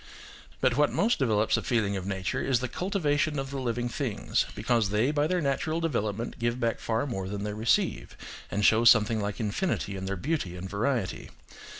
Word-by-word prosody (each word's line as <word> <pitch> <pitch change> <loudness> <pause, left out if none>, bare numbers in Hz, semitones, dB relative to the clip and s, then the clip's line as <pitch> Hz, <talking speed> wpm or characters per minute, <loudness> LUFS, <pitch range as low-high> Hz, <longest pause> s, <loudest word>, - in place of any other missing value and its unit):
But 130 -3 +3
what 145 +1 +3
most 230 +4 +1
develops 110 -5 +2
a - - -1
feeling 110 -5 0
of 95 -1 -4
nature 95 -1 -2
is 130 -3 +1
the 130 - -2
cul 180 +10 -4
tivation 155 -5 +1
of 135 0 -3
the 140 - -3
living 120 -1 -1
things, 120 -3 -1
because 115 -5 +1
they 110 +7 +2
by 150 0 +1
their 180 +1 0
natural 150 +3 0
development 115 -8 -2
give 120 +1 -1
back 115 -1 0
far 115 +3 -1
more 95 -8 -4
than 100 0 -4
they 105 0 -3
receive, 110 +2 0 0.3
and 105 0 0
show 110 +1 +5
something 115 -2 +5
like 100 0 -3
infinity 110 - -1
in 95 0 -5
their 100 - -1
beauty 130 - -2
and 90 +1 -6
variety. 110 +1 -2
115 Hz, 200 wpm, -28 LUFS, 105-140 Hz, 0.3 s, show